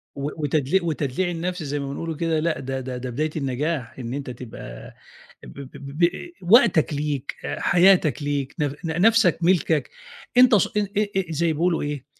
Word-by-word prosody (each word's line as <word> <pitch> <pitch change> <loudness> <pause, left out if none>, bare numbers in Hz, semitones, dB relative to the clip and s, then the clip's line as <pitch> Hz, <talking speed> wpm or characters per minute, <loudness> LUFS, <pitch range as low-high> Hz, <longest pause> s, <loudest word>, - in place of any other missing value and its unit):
و 140 +1 -3
وتدلي 150 +4 +1
وتدليع 160 +1 -1
النَفْس 175 +1 -3
زي 145 0 -3
ما 140 - -4
بنقولوا 165 +3 -4
كده 165 0 0
لأ، 160 0 -1
ده 135 0 -4
ده 130 -1 -5
ده 125 0 -5
بداية 150 +6 -1
النجاح 135 -1 -3
إن 120 0 -5
أنت 140 -1 -5
تبقى 115 - -9 0.5
ب - - -11
ب 135 -1 -9
ب 140 +1 -9
ب 175 - +1
آآ 180 - 0
وقتك 180 -5 +4
ليك، 145 -2 -3
حياتك 175 -6 +3
ليك 140 -2 -2
ن - - +2 0.2
ن 165 +2 -1
نَفْسك 220 -4 +5
مِلْكَك، 165 -4 +2 0.5
أنت 250 -2 +7
س 200 - +3
ان 205 -1 +1
آآ 205 -2 0
زي 160 +1 +1
بيقولوا 170 +2 +1
إيه، 145 -3 -4
155 Hz, 180 wpm, -23 LUFS, 140-175 Hz, 0.5 s, أنت